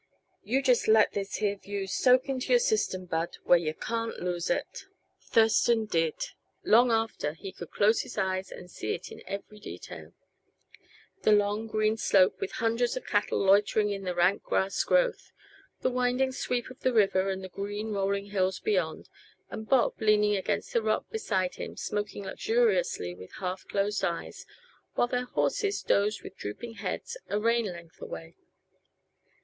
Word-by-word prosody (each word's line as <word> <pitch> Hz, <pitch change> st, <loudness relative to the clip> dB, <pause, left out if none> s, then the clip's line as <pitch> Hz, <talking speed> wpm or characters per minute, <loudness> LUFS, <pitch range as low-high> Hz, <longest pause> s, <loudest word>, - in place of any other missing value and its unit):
You 265 Hz, +4 st, 0 dB
just 250 Hz, -3 st, +3 dB
let 220 Hz, 0 st, +5 dB
this 200 Hz, -1 st, -3 dB
here 205 Hz, -1 st, 0 dB
view 200 Hz, 0 st, -4 dB
soak 255 Hz, +7 st, +3 dB
into 265 Hz, -2 st, -3 dB
your -, -, +7 dB
system, 430 Hz, -, 0 dB
Bud, 165 Hz, -1 st, -2 dB
where 175 Hz, -, +5 dB
yuh 155 Hz, -2 st, -3 dB
can't 230 Hz, 0 st, -3 dB
lose 175 Hz, -1 st, -2 dB
it." -, -, -2 dB, 0.4 s
Thurston 225 Hz, 0 st, +3 dB
did. 165 Hz, -6 st, 0 dB, 0.5 s
Long 240 Hz, +3 st, +5 dB
after 225 Hz, -9 st, 0 dB
he 190 Hz, +4 st, -8 dB
could 175 Hz, -, -9 dB
close 215 Hz, +2 st, +3 dB
his -, -, -9 dB
eyes 190 Hz, -1 st, -1 dB
and 180 Hz, -, -9 dB
see -, -, -3 dB
it 175 Hz, -, -9 dB
in -, -, -10 dB
every 200 Hz, +1 st, -6 dB
detail; -, -, -9 dB, 1.1 s
the -, -, +3 dB
long, 205 Hz, +1 st, +2 dB
green 215 Hz, 0 st, +1 dB
slope 190 Hz, -, +3 dB
with 400 Hz, -, -3 dB
hundreds 230 Hz, +2 st, 0 dB
of -, -, -6 dB
cattle 205 Hz, 0 st, +1 dB
loitering 205 Hz, +1 st, +4 dB
in 200 Hz, -1 st, -3 dB
the 180 Hz, -2 st, -3 dB
rank 175 Hz, +3 st, +3 dB
grass 190 Hz, +1 st, 0 dB
growth; -, -, +1 dB, 0.5 s
the 255 Hz, -, +1 dB
winding 250 Hz, +1 st, +1 dB
sweep 250 Hz, -1 st, -2 dB
of 260 Hz, -, -13 dB
the 255 Hz, -, +1 dB
river 195 Hz, -3 st, +3 dB
and 190 Hz, 0 st, -3 dB
the -, -, -5 dB
green, 205 Hz, +3 st, -4 dB
rolling 200 Hz, 0 st, -1 dB
hills 190 Hz, -2 st, 0 dB
beyond; 180 Hz, -6 st, -1 dB, 0.4 s
and 220 Hz, 0 st, -7 dB
Bob 260 Hz, -4 st, +2 dB
leaning 210 Hz, -1 st, +4 dB
against 190 Hz, -, -2 dB
the 470 Hz, -, +3 dB
rock -, -, 0 dB
beside 195 Hz, -, -1 dB
him, -, -, -6 dB
smoking 205 Hz, -1 st, -3 dB
luxuriously 190 Hz, -, +1 dB
with 90 Hz, +1 st, -12 dB
half 185 Hz, 0 st, -5 dB
closed 200 Hz, 0 st, -1 dB
eyes, 170 Hz, -3 st, -3 dB, 0.5 s
while -, -, +3 dB
their 250 Hz, +1 st, -2 dB
horses 405 Hz, -, 0 dB
dozed 205 Hz, +1 st, +1 dB
with -, -, -9 dB
drooping 225 Hz, -, -6 dB
heads 480 Hz, +1 st, -4 dB
a 205 Hz, -, 0 dB
rein 230 Hz, +1 st, +2 dB
length 170 Hz, -3 st, -9 dB
away. 165 Hz, +1 st, -8 dB
205 Hz, 165 wpm, -29 LUFS, 190-230 Hz, 1.1 s, your